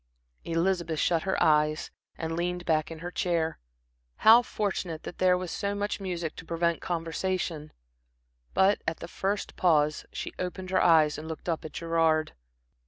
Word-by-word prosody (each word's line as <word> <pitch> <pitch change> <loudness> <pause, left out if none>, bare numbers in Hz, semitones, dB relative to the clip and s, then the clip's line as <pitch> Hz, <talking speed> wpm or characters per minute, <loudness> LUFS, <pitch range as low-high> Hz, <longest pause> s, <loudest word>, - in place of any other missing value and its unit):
Elizabeth 170 -1 0
shut 165 -2 +2
her 190 +2 -1
eyes 150 +1 +2 0.3
and 160 0 -3
leaned 175 +1 -2
back 155 -2 +1
in 165 - -7
her 175 - -4
chair. 165 -3 -1 0.6
How 225 +2 +7
fortunate 190 -8 -3
that - - -8
there 180 -1 +4
was 180 -2 -5
so 200 0 -2
much 205 +1 -2
music 175 -5 -4
to - - -7
prevent 170 0 0
conversation! 165 -2 -2 0.8
But 195 +2 +4
at 165 - -1
the - - -8
first 200 +2 -3
pause 155 -4 +2
she - - -5
opened 185 +1 -4
her 190 - +3
eyes 155 -3 +4
and 155 - -8
looked 160 +1 -7
up 165 -2 -1
at 155 - -8
Gerard. 165 -2 +1
170 Hz, 165 wpm, -28 LUFS, 160-185 Hz, 0.8 s, How